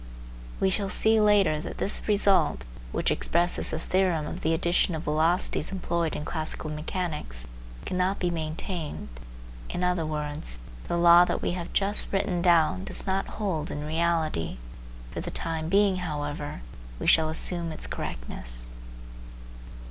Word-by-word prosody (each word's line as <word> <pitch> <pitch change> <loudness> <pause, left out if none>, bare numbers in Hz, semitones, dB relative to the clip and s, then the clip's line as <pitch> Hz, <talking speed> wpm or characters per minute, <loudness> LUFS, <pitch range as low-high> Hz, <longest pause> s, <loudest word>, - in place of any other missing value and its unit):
We 190 - +2
shall 195 0 0
see 220 +2 +3
later 205 -7 +4
that 170 - -6
this 205 - +3
result, 200 -6 +3 0.3
which - - +1
expresses 175 +1 +1
the 160 - -2
theorem 175 -2 +1
of - - -6
the 160 - +1
addition 170 +1 +2
of 160 - -4
velocities 160 +6 +1
employed 170 -3 -1
in 150 - -4
classical 155 -1 -3
mechanics, 150 - -3 0.4
cannot 185 +2 0
be 175 -1 0
maintained; 160 - -4 0.6
in 180 - -3
other 180 -2 +1
words, 150 - -1 0.3
the 175 - 0
law 170 0 +8
that - - -2
we - - +1
have 175 -1 -5
just 200 +1 0
written 195 -3 0
down 160 - +3
does - - -4
not 195 0 0
hold 180 -7 -2
in 150 -3 -4
reality. 160 - 0 0.5
For - - -4
the - - -5
time 160 -1 -2
being, 200 0 +4
however, 145 - -4 0.3
we - - -5
shall 160 -1 +5
assume 170 +1 -1
its 155 - -6
correctness. - - -4
170 Hz, 150 wpm, -27 LUFS, 155-185 Hz, 0.6 s, law